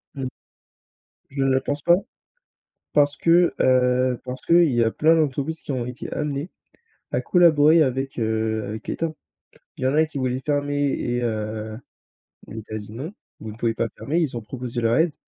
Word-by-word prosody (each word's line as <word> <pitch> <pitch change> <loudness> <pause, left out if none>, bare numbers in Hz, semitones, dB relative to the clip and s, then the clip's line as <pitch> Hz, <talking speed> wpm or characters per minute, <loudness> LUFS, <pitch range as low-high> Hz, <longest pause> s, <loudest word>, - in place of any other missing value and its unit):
,mmh. 135 -2 -4 1.0
Je 135 0 -2
ne 135 - +2
le 130 0 +2
pense 145 +2 -3
pas. 175 - +6 1.0
Parce 145 -1 +3
que, 170 +1 +4
heu, 125 -1 +3
parce 125 0 -6
qu'il 170 0 +5
y 120 -1 +3
a 115 - +1
plein 160 +6 +4
d'entreprises 155 +1 -1
qui - - -6
ont 125 -3 -2
été 125 0 -7
amenées 150 +2 -3 0.6
à - - +1
collaborer 160 -2 +5
avec, 135 -1 -2
heu, 110 -1 -1
avec 110 +2 -7
l'État. 165 -1 -2 0.6
Il - - -4
y - - +3
en 130 - +1
a 160 +1 +4
qui 155 -2 -7
voulaient 130 -1 -1
fermer 145 +1 0
et 120 0 -2
heu, 110 -1 -3 0.7
l'État 110 0 -7
a - - -1
dit: 105 0 -9
«Non, 140 +10 -6 0.3
vous 110 - -6
ne 105 - -12
pouvez 115 -1 0
pas 115 - -1
fermer». 160 +5 -1
Ils 140 -7 -1
ont - - -4
proposé 120 +2 -5
leur 115 0 +2
aide. 160 +2 +2
130 Hz, 190 wpm, -23 LUFS, 115-150 Hz, 1.0 s, pas